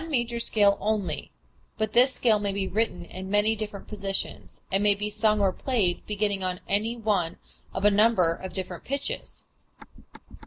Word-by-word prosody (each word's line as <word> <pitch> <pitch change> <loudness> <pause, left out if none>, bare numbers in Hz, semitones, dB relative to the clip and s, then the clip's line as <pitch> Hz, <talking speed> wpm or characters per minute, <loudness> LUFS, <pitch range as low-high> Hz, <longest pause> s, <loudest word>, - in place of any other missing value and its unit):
We - - -6
have - - -9
then - - -6
one - - +4
major 235 0 -3
scale 205 -3 +4
only, 210 -2 -1 0.5
but 215 -1 -1
this 250 +3 +6
scale 225 -4 +2
may 205 -1 -1
be 195 -1 -2
written 215 -4 -1
in 190 +2 -8
many 205 +2 +3
different 210 -2 -5
positions, 195 -2 -4
and 195 - +2
may 205 -1 +4
be 210 +1 -4
sung 215 0 +2
or 195 -2 +3
played 210 -9 0
beginning 205 -2 -1
on 180 -1 -2
any 215 +4 0
one 205 -7 0 0.3
of 190 - -3
a 210 - +7
number 205 -5 +4
of 190 +2 -7
different 185 -2 -4
pitches. 280 +1 -4
205 Hz, 190 wpm, -26 LUFS, 195-220 Hz, 0.5 s, a